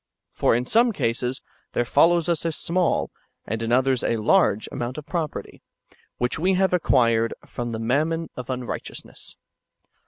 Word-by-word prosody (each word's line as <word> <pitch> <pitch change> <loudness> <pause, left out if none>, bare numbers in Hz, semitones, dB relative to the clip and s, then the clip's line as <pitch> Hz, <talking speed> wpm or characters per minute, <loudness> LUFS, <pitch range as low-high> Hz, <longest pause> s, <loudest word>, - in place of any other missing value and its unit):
For - - +2
in 120 +1 0
some 235 - +3
cases 125 - -2 0.3
there 120 - +1
follows 170 +6 +4
us 170 -3 0
a 165 - 0
small, 175 +3 0 0.3
and 110 +2 -3
in 115 0 -2
others 130 0 +2
a 115 - +1
large 110 - +3
amount 120 +3 -4
of 150 - -7
property, 165 -3 -4 0.6
which 125 +5 -1
we 185 +3 +2
have 190 0 +2
acquired 115 -9 +3
' - - -16
from 120 0 -2
the 115 - -3
mammon 155 +8 0
of 125 0 -7
unrighteousness. 125 -1 -6
130 Hz, 160 wpm, -24 LUFS, 120-170 Hz, 0.6 s, follows